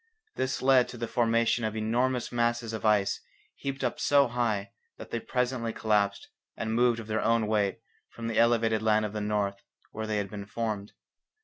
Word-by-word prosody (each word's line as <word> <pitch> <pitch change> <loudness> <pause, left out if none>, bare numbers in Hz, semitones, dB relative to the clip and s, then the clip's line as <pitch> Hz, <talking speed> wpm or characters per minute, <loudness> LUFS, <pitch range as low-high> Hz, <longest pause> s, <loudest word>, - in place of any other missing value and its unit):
This 130 -1 -2
led 130 -2 +5
to 125 - -9
the 115 0 -3
formation 115 0 +2
of 110 0 -2
enormous 120 +3 0
masses 120 -1 0
of 110 - -5
ice 105 -2 +2 0.3
heaped 135 -1 -4
up 125 - -1
so 140 -1 +4
high 115 -3 -1 0.3
that - - -10
they 115 - -1
presently 125 -1 -1
collapsed 105 -2 +1 0.3
and 110 0 -2
moved 120 0 +3
of 115 - -7
their 110 0 -1
own 115 -1 +2
weight 105 -1 0 0.3
from 115 - -8
the 115 -1 0
elevated 115 -2 +3
land 110 -1 +3
of 105 - -5
the 105 - -3
north 105 -1 -1 0.3
where 110 0 -5
they 110 -1 0
had 100 -2 -3
been 100 -2 -7
formed. 105 -2 -3
115 Hz, 190 wpm, -28 LUFS, 105-120 Hz, 0.3 s, led